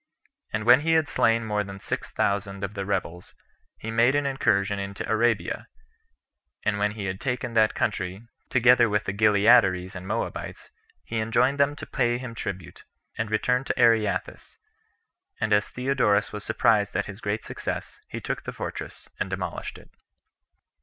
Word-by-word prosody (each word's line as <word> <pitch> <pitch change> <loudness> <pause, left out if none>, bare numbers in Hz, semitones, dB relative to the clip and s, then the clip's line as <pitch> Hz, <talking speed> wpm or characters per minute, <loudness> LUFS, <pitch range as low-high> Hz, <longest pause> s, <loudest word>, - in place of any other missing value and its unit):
And 110 0 -2
when 120 +3 +7
he 165 +2 +2
had 160 -2 +3
slain 115 -3 +2
more 105 -1 0
than 100 0 -9
six - - -4
thousand 100 0 -1
of 100 +1 -3
the 100 -2 -4
rebels, 90 -3 -3 0.4
he 115 - -6
made 115 +4 +4
an 145 0 +1
incursion 100 -7 +1
into 100 0 -5
Arabia; 110 -5 0 1.0
and 100 -1 0
when 105 0 +1
he 105 -3 -5
had 95 0 -4
taken 125 -2 -2
that 110 -1 +3
country, 100 0 -2 0.2
together 120 -1 +5
with 105 0 +1
the 100 - -3
Gileadires 100 -3 +4
and 90 +1 -7
Moabites, 110 +3 -4 0.3
he 115 - -3
enjoined 120 +5 +2
them 140 +1 +3
to - - -8
pay 120 -2 0
him 125 -2 -7
tribute, 95 -7 -6 0.3
and 110 -1 -2
returned 125 +5 +1
to - - -2
Areathus; 115 -4 +1 0.8
and 110 -1 +1
as 105 0 +2
Theodorus 125 -6 +1
was 105 -1 -5
surprised 105 -1 +2
at - - 0
his 105 +2 -9
great 105 +1 -2
success, - - -5
he - - -6
took - - -4
the - - -4
fortress, - - -7
and - - -2
demolished - - -4
it. - - -17
110 Hz, 165 wpm, -26 LUFS, 100-120 Hz, 1.0 s, when